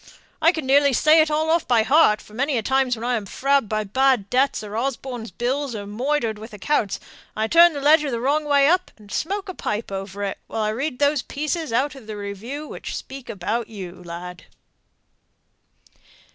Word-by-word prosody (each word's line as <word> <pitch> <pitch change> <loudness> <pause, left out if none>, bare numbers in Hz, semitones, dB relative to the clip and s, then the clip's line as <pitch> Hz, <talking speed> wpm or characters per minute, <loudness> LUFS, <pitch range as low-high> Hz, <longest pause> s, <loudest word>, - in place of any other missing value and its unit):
I 325 +1 +6
can 315 -5 -5
nearly 280 +1 +4
say 310 +5 +5
it 310 - +1
all 310 +1 +1
off 335 0 +1
by 235 -3 +4
heart, 245 -3 +4
for 210 - -17
many 270 +3 0
a 225 - -1
time 265 +2 +2
when 235 -2 -2
I'm 235 -4 -1
frabbed 275 0 +1
by 215 0 0
bad 245 0 +1
debts, 260 -2 +2
or 210 0 -7
Osborne's 245 -1 -3
bills, 255 +1 -2
or 205 -1 -5
moidered 230 +1 -1
with 220 +1 -10
accounts, 210 0 -1 0.4
I 220 - +1
turn 340 +5 +6
the 285 - -5
ledger 295 -4 +3
wrong 290 +5 +1
way 285 -1 +4
up, 360 +3 +2
and 210 -2 -16
smoke 400 +4 -2
a 370 - -5
pipe 210 - -4
over 195 +1 -5
it, 195 - -3
while 220 - -2
I 215 - +1
read 250 +5 -2
those 285 0 +2
pieces 305 +1 -3
out 260 +5 +1
of 265 -6 -13
the 215 -1 -6
review 215 +9 -6
which - - -7
speak 270 -2 -9
about 215 +4 -2
you, 185 -5 -9
lad!" 175 0 -8
250 Hz, 195 wpm, -23 LUFS, 215-290 Hz, 0.4 s, I